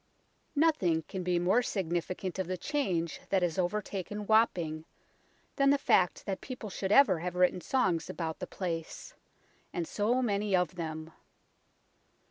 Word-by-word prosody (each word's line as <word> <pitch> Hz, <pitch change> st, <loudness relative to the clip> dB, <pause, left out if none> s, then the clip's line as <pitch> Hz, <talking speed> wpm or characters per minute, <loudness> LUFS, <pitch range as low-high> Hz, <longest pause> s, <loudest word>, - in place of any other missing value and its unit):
" -, -, -42 dB
NOTHING 240 Hz, -, +2 dB
can 190 Hz, +4 st, -6 dB
be 180 Hz, 0 st, +1 dB
more 185 Hz, +7 st, +3 dB
significant 185 Hz, -2 st, -3 dB
of 190 Hz, -, -1 dB
the 185 Hz, 0 st, -2 dB
change 180 Hz, -, -1 dB
that 190 Hz, -2 st, +2 dB
has 175 Hz, 0 st, 0 dB
overtaken 205 Hz, +2 st, -2 dB
Wapping 175 Hz, -8 st, +2 dB, 0.7 s
than 275 Hz, 0 st, +4 dB
the 285 Hz, -, +5 dB
fact 180 Hz, -9 st, +2 dB
that 195 Hz, -1 st, -3 dB
people 250 Hz, -5 st, -7 dB
should 190 Hz, +1 st, -3 dB
ever 210 Hz, -, +6 dB
have 180 Hz, +1 st, -4 dB
written 180 Hz, 0 st, +3 dB
songs 180 Hz, -11 st, 0 dB
about 160 Hz, -2 st, -4 dB
the 180 Hz, -, -5 dB
place 165 Hz, -4 st, -5 dB, 0.6 s
and 170 Hz, -2 st, -3 dB
so 235 Hz, +5 st, +1 dB
many 205 Hz, -3 st, +1 dB
of 180 Hz, -4 st, +1 dB
them. 160 Hz, -2 st, -6 dB
185 Hz, 150 wpm, -31 LUFS, 170-210 Hz, 0.7 s, ever